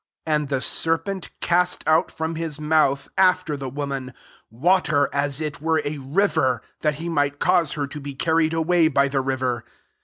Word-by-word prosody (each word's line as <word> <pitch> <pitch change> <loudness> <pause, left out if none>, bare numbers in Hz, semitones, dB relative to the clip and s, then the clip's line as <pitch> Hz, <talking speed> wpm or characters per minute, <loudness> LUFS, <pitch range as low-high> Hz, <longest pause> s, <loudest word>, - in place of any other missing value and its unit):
15 160 - 0
And 150 -2 -2
the 135 -2 -1
serpent 165 +6 -1
cast 180 +1 +1
out 155 +1 +3
from 160 +1 -4
his 160 -2 -3
mouth, 150 -3 +2
after 180 -4 +3
the 135 -2 -5
wo 145 +3 -4
man, 130 -3 -5 0.3
water 150 - +2
aa 140 +1 +1
it 150 -2 -4
were 160 0 +1
a 145 0 -3
liver, 135 -3 +1 0.2
that 150 -1 0
he 165 +3 -6
might 145 -3 0
cause 175 -2 +2
her 145 -2 -2
to 145 +2 -8
be 140 -1 -7
carried 160 +2 +2
away 165 0 +3
by 140 -2 +2
the 135 -1 0
river. 130 -3 -2
150 Hz, 185 wpm, -23 LUFS, 140-165 Hz, 0.3 s, out